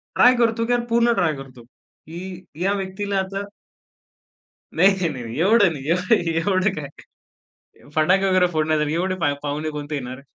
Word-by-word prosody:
Try 250 +1 +6
करतो, 230 -1 +1
की 240 - -2
यार 240 -1 0
पूर्ण 235 +1 +3
ट्राय 175 -5 +1
करतो, 130 -3 -11
की 175 +8 -11 0.2
या 195 +2 +2
व्यक्तीला 200 +1 -3
आता 195 +1 -3 1.3
नाही, 190 0 +3
नाही, 125 - -6
नाही. 115 +5 -6
एवढं 195 0 +4
नाही. 140 -2 -8
य 170 - +4 0.4
एवढं 185 +3 +1
काय 145 -6 -6 1.1
फटाके 185 +5 +3
वगैरे 185 -1 +4
फोडण्यासाठी 155 -1 0
एवढे 185 +3 0
पा 145 - +2
पाहुणे 150 +2 -3
कोणते 145 +1 -6
येणार? 130 -1 -5
180 Hz, 155 wpm, -22 LUFS, 150-195 Hz, 1.3 s, ट्राय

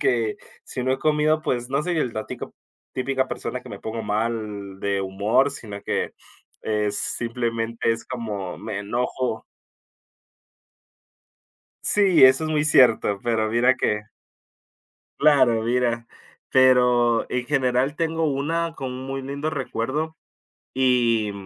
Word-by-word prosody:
que 115 -3 +1 0.3
si 125 - -4
no 130 - +1
he 130 - -1
comido, 155 +1 +2
pues 120 -5 -2
no 140 +3 0
soy 175 -1 -1
el 125 -6 -1
datico, 110 -1 -6 0.4
típica 130 0 -1
persona 125 - -4
que - - -12
me 100 - -8
pongo 110 +2 -5
mal 105 -2 -3
de 100 -1 0
humor, 100 +8 +1
sino 105 -7 -7
que - - -2 0.5
es 105 -1 0
simplemente 115 -1 -1
es 115 0 -6
como 105 -7 -5
me 110 -2 -5
enojo. 120 +2 -2 2.4
Sí, 195 -7 +5
eso 130 +4 +6
es - - -3
muy 150 -1 +1
cierto, 120 -8 +4
pero 110 -2 0
mira 125 +3 +4
que 105 -3 0 1.2
Claro, 130 -7 +4
mira, 120 -1 0 0.4
pero 125 -2 +4
en 125 -1 -2
general 130 0 +1
tengo 165 0 0
una 160 +4 -1
con 130 -2 -5
muy 135 0 -4
lindo 140 +3 -3
recuerdo, 150 +2 -3 0.6
y 120 -4 +2
125 Hz, 130 wpm, -23 LUFS, 110-135 Hz, 2.4 s, eso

